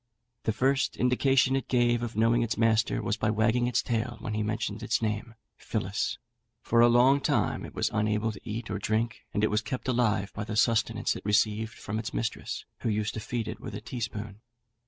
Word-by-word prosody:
The - - +2
first 130 +5 +1
indication 130 +1 +3
it 135 - -2
gave 120 -1 +2
of 120 -2 -4
knowing 115 +2 +3
its 115 -1 -1
master 115 0 +2
was 110 - -1
by 110 - 0
wagging 110 +3 +2
its 125 - +1
tail 120 +1 -2
when 110 - -4
he 105 - -1
mentioned 105 0 -2
its 115 - 0
name, 110 +1 -3 0.2
Phillis; 105 -2 -2 0.4
for 115 +1 +3
a 120 - +8
long 125 +4 +5
time - - +1
it - - -9
was - - 0
unable 105 +1 +1
to 100 - -11
eat 110 +1 -5
or - - -2
drink, 115 +2 -1
and 105 - -1
it 110 - +3
was 105 +1 +2
kept 130 +4 -5
alive 110 -6 +1
by 105 - -4
the 105 0 -5
sustenance 115 0 +2
it - - -8
received 105 +2 +1
from 105 +2 -4
its 115 +3 -5
mistress, 115 - -3
who - - -1
used 105 0 -1
to - - -4
feed 115 +1 -3
it - - -5
with - - -7
a - - -6
teaspoon. 110 -3 -5
110 Hz, 210 wpm, -28 LUFS, 105-120 Hz, 0.4 s, a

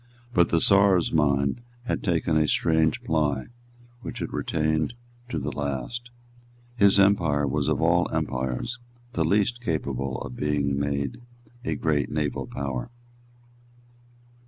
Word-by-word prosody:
But 85 -5 +4
the 85 - +3
Czar's 100 -2 +4
mind 70 - +2 0.2
had 120 - -1
early 90 -4 0
taken 80 0 -1
a 80 -1 +3
strange 80 0 +2
ply 75 -3 0 0.5
which - - -6
it - - -4
retained 80 +6 0 0.3
to 125 - -2
the - - -2
last. 75 - -4 0.7
His 100 -3 +5
empire 85 -8 +3
was 70 +1 -1
of 75 -2 +1
all - - +3
empires 65 - -2 0.3
the 85 - +1
least 105 +8 +1
capable 70 - -2
of 60 - -7
being 70 -1 0
made 70 - -2 0.4
a - - -1
great 75 -4 0
naval 75 -2 -2
power. 70 -3 -4
75 Hz, 135 wpm, -26 LUFS, 70-95 Hz, 0.7 s, His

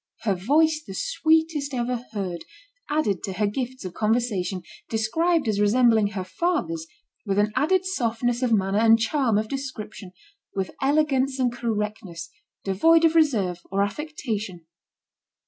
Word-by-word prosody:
Her 210 -3 +1
"voice 305 - +2
the 195 - -7
sweetest 320 - +1
ever 240 0 -2
heard/' 180 -6 -4 0.4
added 295 - 0
to 195 - -4
her 210 +3 0
gifts 250 +2 -4
of 180 - -5
conversation, 210 -4 0 0.3
described 310 +9 +1
as 210 -2 0
resembling 220 0 +4
her 195 -2 -4
father's 180 - -2 0.4
with 195 -2 -1
an 210 +1 +2
added 370 +5 +2
softness 240 -7 -1
of 250 -2 +1
manner 195 -1 +2
and 225 0 +6
charm 230 -1 +1
of 215 +1 0
description, 225 -7 -6 0.4
with 190 -1 -2
elegance 275 -2 +2
and 250 -2 +1
correctness, 210 -7 -4 0.3
devoid 325 - +4
of 325 - +4
reserve 220 - +2
or 195 +1 +1
affectation. 215 - -4
225 Hz, 140 wpm, -24 LUFS, 200-280 Hz, 0.4 s, and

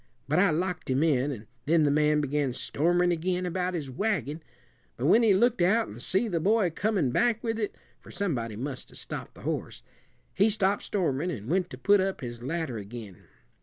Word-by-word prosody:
But 155 +5 +2
I 200 - +5
locked 180 +1 -2
him 130 +3 +2
in, 145 -3 +2
and 115 -5 -7 0.2
then 160 0 +4
the 145 - +3
man 150 0 +3
began 145 -2 0
stormin' 175 +7 +1
again 180 +2 -1
about 180 +1 -1
his 145 -6 -4
wagon; 160 - -1 0.6
but 125 - -2
when 220 +10 +6
he 215 -4 +5
looked 235 +1 +3
out 205 +7 +3
an' 105 - -9
see 190 - +1
the 175 -6 -1
boy 200 0 +2
comin' 185 - 0
back 235 - +1
with 225 -1 -1
it 210 - -2 0.2
for - - -16
somebody 120 - -2
must 130 +3 -5
'a' - - -12
stopped - - -7
the - - -13
horse - - -4 0.5
he 205 +3 +4
stopped 200 -1 +1
stormin' 170 -4 -1
and 125 - -5
went 180 0 +1
to 130 - -8
put 200 +8 +4
up 190 0 -2
his 120 -2 -6
ladder 140 -3 -3
ag'in. 105 -2 -9
170 Hz, 205 wpm, -28 LUFS, 135-195 Hz, 0.6 s, when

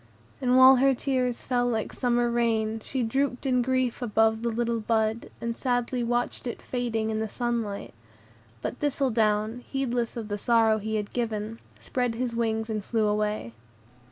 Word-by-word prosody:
And 255 -1 +3
while 260 0 +9
her 270 +1 +4
tears 250 -2 -1
fell 245 -2 +1
like 225 -3 -1
summer 240 -1 +1
rain, 225 -2 +1
she 260 -2 -2
drooped 265 +3 -1
in 250 -2 +3
grief 255 -1 0
above 220 -1 +2
the 235 - 0
little 235 0 -1
bud, 220 0 0
and 235 0 -3
sadly 245 -1 -1
watched 240 +1 -1
it 240 - -4
fading 225 -3 -2
in 215 - -1
the 220 0 -2
sunlight; 230 - -3 0.7
but - - -4
Thistledown, 225 -6 +1
heedless 245 -2 -2
of 225 -2 -4
the 205 -1 -3
sorrow 225 -1 +3
he 220 +1 -3
had 210 -1 -3
given, 225 -2 -3 0.2
spread 245 -2 -1
his 240 0 -2
wings 225 -1 0
and 215 -2 -3
flew 220 0 0
away. 210 - -1
235 Hz, 165 wpm, -27 LUFS, 220-245 Hz, 0.7 s, while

